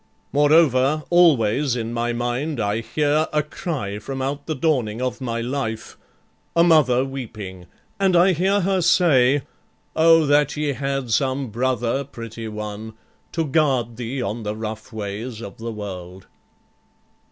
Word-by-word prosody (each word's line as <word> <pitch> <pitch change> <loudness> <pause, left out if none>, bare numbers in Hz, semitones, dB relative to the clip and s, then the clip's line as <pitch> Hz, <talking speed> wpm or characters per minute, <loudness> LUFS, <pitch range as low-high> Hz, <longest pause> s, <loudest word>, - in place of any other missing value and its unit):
Moreover, 145 -1 +4
always 140 -6 +4
in 115 -1 -3
my 120 0 -1
mind 120 +5 -2
I 105 +1 0
hear 150 +5 +1
A 150 0 +1
cry 140 - -4
from 135 +5 -6
out 140 +2 -3
the 155 - -1
dawning 130 -7 0
of 130 +1 -3
my 115 -2 -2
life, 120 -3 -4 0.6
A 170 - +5
mother 140 -7 +4
weeping, 105 -9 -7 0.3
and 190 -2 +3
I 180 +2 +6
hear 190 +4 +2
her 190 0 +1
say, 145 -6 +4 0.5
'O 165 0 +5
that 145 +1 +2
ye 150 -1 0
had 135 -1 -3
some 130 +2 0
brother, 125 +2 0
pretty 115 -4 -8
one, 105 0 -6 0.4
To 165 -1 0
guard 130 -6 +1
thee 125 +2 -3
on 110 +3 -3
the 105 0 -3
rough 110 +1 -6
ways 110 +2 -5
of 100 -4 -9
the 115 +1 -4
world.'" 95 -4 -8
130 Hz, 145 wpm, -22 LUFS, 110-150 Hz, 0.6 s, I